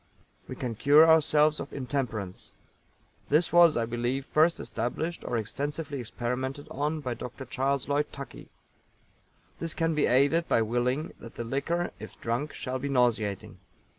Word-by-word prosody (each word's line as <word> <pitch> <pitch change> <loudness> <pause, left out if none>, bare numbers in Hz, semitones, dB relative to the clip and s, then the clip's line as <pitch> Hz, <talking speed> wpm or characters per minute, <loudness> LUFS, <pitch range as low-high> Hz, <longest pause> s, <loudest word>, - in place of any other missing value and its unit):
We - - -6
can 120 -2 -3
cure 145 +7 +6
ourselves 155 -1 +4
of - - -6
intemperance. 120 -8 -4 0.8
This 155 +4 +3
was, 170 -4 +7
I 115 - +1
believe, 120 +3 -2
first 160 +3 +3
established 155 +9 -3
or 120 - -2
extensively 140 +6 -4
experimented 125 +4 -3
on 150 +3 -2
by 125 -4 -2
Dr. 125 +3 -7
CHARLES 135 +2 -1
LLOYD 145 +1 0
TUCKEY. 140 -1 -9 1.1
This 165 -1 -2
can 165 -1 +1
be 150 - +2
aided 145 +7 +3
by 115 - +3
willing 125 +7 -1
that 115 - -11
the 120 - -4
liquor, 165 +8 -1
if - - -10
drunk, 120 +6 -2
shall 130 0 -4
be 140 +2 -3
nauseating. 115 -6 0
135 Hz, 150 wpm, -28 LUFS, 120-150 Hz, 1.1 s, was